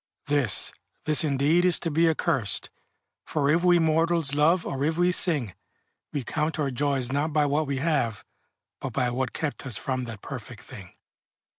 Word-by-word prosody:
This, 145 -8 +2 0.3
this 155 0 +3
indeed 150 +4 +2
is 180 -2 +5
to 165 - -2
be 165 +2 +3
accursed, 150 - -1 0.5
For 145 -2 0
if 170 +2 +2
we 175 -1 +5
mortals 165 -2 +1
love, 165 +4 +2
or 135 0 -3
if 160 +2 0
we 175 +1 +3
sing, 150 - +2 0.6
We 145 - -3
count 155 +6 -2
our 145 -3 -1
joys 135 -1 0
not 145 +3 -1
by 150 -1 +3
what 145 +2 0
we 140 -1 -2
have, 135 -7 -1 0.5
But - - -6
by 125 -1 0
what 130 +1 -2
kept 155 -3 -4
us 115 -7 0
from 130 -1 -3
that 110 -4 -9
perfect - - -8
thing. - - -11
150 Hz, 175 wpm, -26 LUFS, 135-165 Hz, 0.6 s, is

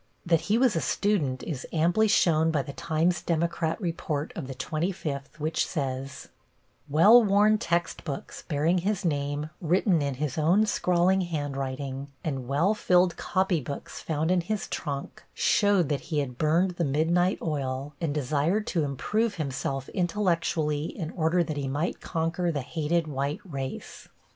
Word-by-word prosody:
That 165 -2 +3
he 215 - +4
was 250 -4 +3
a 165 - +1
student 155 -11 0
is 145 -6 -5
amply 175 +7 +3
shown 165 -6 +3
by 150 -4 +1
the 140 - -8
Times 165 +4 0
Democrat 165 -1 -1
report 165 -5 -3
of 130 - -5
the 135 - -6
twenty 165 +7 -2
fifth, 140 -3 -6
which 155 +2 0
says: 135 -3 -4 0.6
"Well 205 +12 +7
worn 210 +1 +4
textbooks, 170 -5 -3
bearing 160 +4 +2
his 195 +1 -1
name 145 0 -1
written 175 0 +2
in 140 -2 -1
his 150 +1 -2
own 180 +8 +4
scrawling 185 -2 +2
handwriting, 140 -4 -3 0.2
and 135 -5 -3
well 155 +10 +2
filled 180 -4 +3
copy 185 -4 0
books 140 +2 -7
found 160 +1 -1
in 185 -1 +3
his 210 +4 -3
trunk, 140 -4 -5
showed 205 -5 +3
that 145 -2 0
he 155 - -1
had 125 -4 -2
burned 165 +5 +3
the 175 -1 -2
midnight 165 +6 +2
oil, 140 -2 -3
and 165 -3 0
desired 150 +8 0
to 165 -4 0
improve 205 - -1
himself 135 -3 -3
intellectually 170 -5 0
in 160 -1 -5
order 170 +1 +2
that 155 -2 -4
he 140 -1 -2
might 145 +6 -2
conquer 170 +2 -1
the 145 -3 -2
hated 160 +4 -1
white 140 0 -3
race." 135 -6 -6
160 Hz, 160 wpm, -27 LUFS, 145-180 Hz, 0.6 s, Well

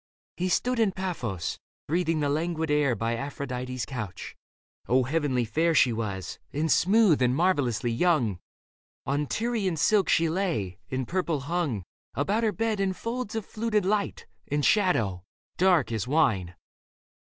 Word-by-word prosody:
He 185 +1 -1
stood 250 +6 +1
in 215 -4 +3
Paphos, 125 - -3 0.3
breathing 165 0 +1
the 145 - +1
languid 160 +1 -1
air 145 -4 +3
By 115 +2 -1
Aphrodite's 125 -2 -4
couch. 110 -6 -6 0.5
O 130 +2 +3
heavenly 135 -3 0
fair 160 +8 +1
She 125 -4 +5
was, 100 -5 -4
and 155 +2 0
smooth 195 -4 +4
and 125 0 +3
marvellously 135 - +1
young! 120 - +1 0.7
On 145 +2 0
Tyrian 220 - -1
silk 200 +5 +3
she 165 -1 +4
lay, 160 - -2
and 130 -2 -2
purple 170 -5 -1
hung 145 - -2 0.3
About 200 - +1
her 220 - +2
bed 220 +2 -1
in 195 -1 +1
folds 230 +2 -4
of 220 -3 -2
fluted 215 -3 -1
light 205 +1 -1 0.2
And 145 0 0
shadow, 115 - +2 0.3
dark 175 -10 +3
as 110 -1 -2
wine. 115 - +1
155 Hz, 145 wpm, -27 LUFS, 125-185 Hz, 0.7 s, She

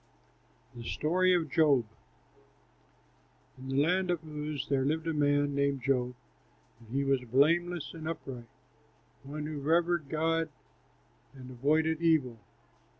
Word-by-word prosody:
THE 120 - -9
STORY 180 +9 +2
OF 160 -5 -1
JOB 145 -7 +4 1.7
In 130 - -9
the 135 +2 +2
land 180 +3 +1
of 175 -2 -1
Uz 150 -2 -4
there 135 -2 +1
lived 155 +4 -1
a 165 - -1
man 145 -1 +2
named 140 -2 0
Job; 125 -2 0 0.6
and 115 -2 -18
he 140 +2 0
was 135 -2 +1
blameless 165 +7 +2
and 160 -1 -7
upright, 130 -7 -7 0.7
one 150 +2 -6
who 150 -1 -4
revered 170 0 +1
God 165 +1 0 0.9
and 130 -1 -10
avoided 155 +5 +1
evil. 145 -9 +2
150 Hz, 130 wpm, -30 LUFS, 135-165 Hz, 1.7 s, JOB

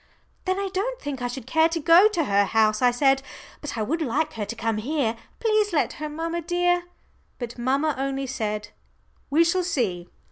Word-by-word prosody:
"Then 375 0 0
I 395 0 -2
don't - - -2
think 285 -3 -5
I 245 - 0
should 245 -1 -6
care 320 +5 +3
to 330 0 -2
go 335 +6 +7
to 355 -7 0
her 200 -5 +3
house," 215 0 +2
I 250 - +6
said, 270 +2 +3 0.4
"but 295 -5 -5
I 220 - 0
would 325 +10 -1
like 300 +3 0
her 215 -2 -3
to 235 - -6
come 225 -1 -1
here. 250 -1 -1 0.2
Please 430 -3 +2
let 300 - +1
her, 305 - -3
mamma 330 +3 -3
dear." 355 +1 +1 0.5
But 240 -1 -6
mamma 275 +5 +1
only 270 0 -2
said, 210 -5 -3 0.6
"We 310 +4 +5
shall 360 +2 +1
see." 220 - -1
285 Hz, 200 wpm, -25 LUFS, 235-335 Hz, 0.6 s, go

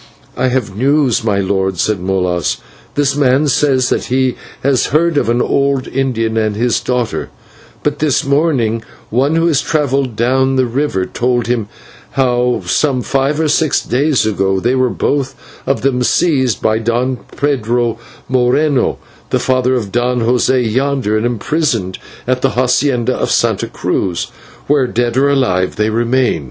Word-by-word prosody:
"I 130 - 0
have 125 -6 -1
news, 130 0 +2
my 105 -3 +1
lord," 95 -1 -1
said 105 +2 0
Molas. 90 -2 -1 0.4
"This 145 -1 +1
man 140 +1 +2
says 135 -3 +2
that - - 0
he 130 0 +1 0.3
has 135 -2 +2
heard 165 +4 +1
of 145 - +1
the 120 +1 +2
old 140 -1 0
Indian 115 -4 -1
and 110 -2 0
his 120 +2 +1
daughter, 125 -2 -1
and - - -8
that - - -27
but 145 0 -1
this 150 -4 +1
morning 135 -6 +1 0.3
one 135 +7 +1
who 165 0 +2
has 155 -5 +2
travelled 140 -5 0
down 130 +3 +1
the 130 -1 +2
river 120 -6 -1
told 120 +2 -1
him 120 -3 -1 0.5
how 125 -4 +1
some 130 - +1
five 135 +2 0
or 160 - +1
six 155 0 +2
days 140 +1 +1
ago 95 -2 0
they 120 +5 +1
were 130 -1 +2
both 135 +1 -1 0.3
of 135 - 0
them 130 -2 +1
seized 130 -1 +1
by 110 0 +2
Don 120 +3 0 0.2
Pedro 120 -4 0 0.3
Moreno, 130 +2 +1 0.3
the - - +1
father 130 0 +1
of 110 -6 -3
Don 120 +1 0
José 125 +2 +2
yonder, 130 -2 0
and 110 +2 +1
imprisoned 120 - -1 0.3
at 125 0 0
the - - 0
/hacienda/ 125 -1 +1
of - - -1
Santa - - +1
Cruz, 90 -3 -2 0.3
where, 140 -3 +2
dead 120 0 -1
or 140 +2 +3
alive, 105 -10 +1
they 105 +1 0
remain." 120 +3 +1
125 Hz, 165 wpm, -15 LUFS, 115-140 Hz, 0.5 s, or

